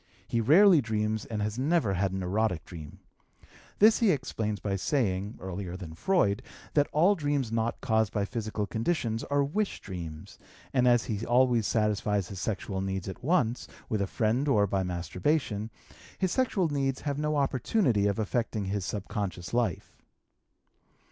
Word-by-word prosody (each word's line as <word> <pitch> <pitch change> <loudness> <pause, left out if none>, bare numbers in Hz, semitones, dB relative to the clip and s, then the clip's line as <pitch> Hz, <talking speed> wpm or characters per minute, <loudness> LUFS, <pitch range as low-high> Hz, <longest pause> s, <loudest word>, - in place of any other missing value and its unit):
He 115 - 0
rarely 170 - +6
dreams 110 -2 -1
and 105 -2 -3
has 105 +3 -3
never 145 - +2
had 95 +1 0
an 95 0 -3
erotic 95 -2 0
dream; 80 -5 -10 0.8
this 215 +2 +6
he 230 - +4
explains 110 - -1
by 100 -2 -2
saying 100 -2 -1
(earlier 95 -1 -5
than 85 -4 -8
Freud) 105 - +1 0.3
that 145 -1 +3
all 175 +7 +4
dreams 145 - -1
not 115 0 -1
caused 110 -4 +1
by 100 -1 0
physical 110 -2 -3
conditions 115 - -1
are 145 0 +1
wish 200 +9 -1
dreams, 85 -5 -8 0.3
and 125 -2 +3
as 120 -1 +4
he 110 -1 -3
always 120 -2 +3
satisfies 105 -3 0
his 95 - -7
sexual 100 -2 -3
needs 95 -1 -3
at 95 - -7
once, 130 -6 +1 0.2
with 110 -2 0
a 100 - 0
friend 115 +8 0
or 105 -7 +4
by 95 -1 0
masturbation, 100 - -1 0.5
his 185 -2 0
sexual 220 -8 +1
needs 135 -3 -1
have 145 -1 -2
no 150 0 0
opportunity 130 - +1
of 100 - 0
affecting 110 -1 -1
his 100 0 -2
subconscious 100 -2 -4
life. 120 -8 -2
110 Hz, 160 wpm, -29 LUFS, 100-140 Hz, 0.8 s, rarely